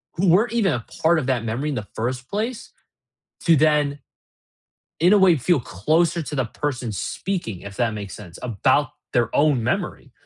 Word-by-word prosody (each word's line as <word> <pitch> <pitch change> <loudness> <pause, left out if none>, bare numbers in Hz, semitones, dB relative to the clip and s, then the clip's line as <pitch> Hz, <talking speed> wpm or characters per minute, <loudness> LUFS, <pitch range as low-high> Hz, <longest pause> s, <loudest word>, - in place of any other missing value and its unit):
who 190 +3 +1
weren't 205 +7 +4
even 205 - +2
a 120 -2 -4 0.2
part 160 0 +4
of 130 - -4
that 120 -4 0
memory 125 +7 -2
in 145 - -2
the 105 -4 -5
first 125 +2 -3
place 230 +4 -3 0.7
to 165 -2 +5
then, 150 -1 +2 1.0
in 180 +5 +5
a 210 - +7
way, 185 -4 +5
feel 140 +2 +2
closer 160 - +1
to 150 - -6
the 130 -3 0
person 125 -4 -3
speaking, 110 - -4
if 100 0 -9
that 120 -2 +1
makes 100 -2 -6
sense, 90 -6 -11
about 115 -7 +1 0.2
their 120 -2 +1
own 145 -5 +3
memory. - - -2
145 Hz, 180 wpm, -22 LUFS, 115-170 Hz, 1.0 s, a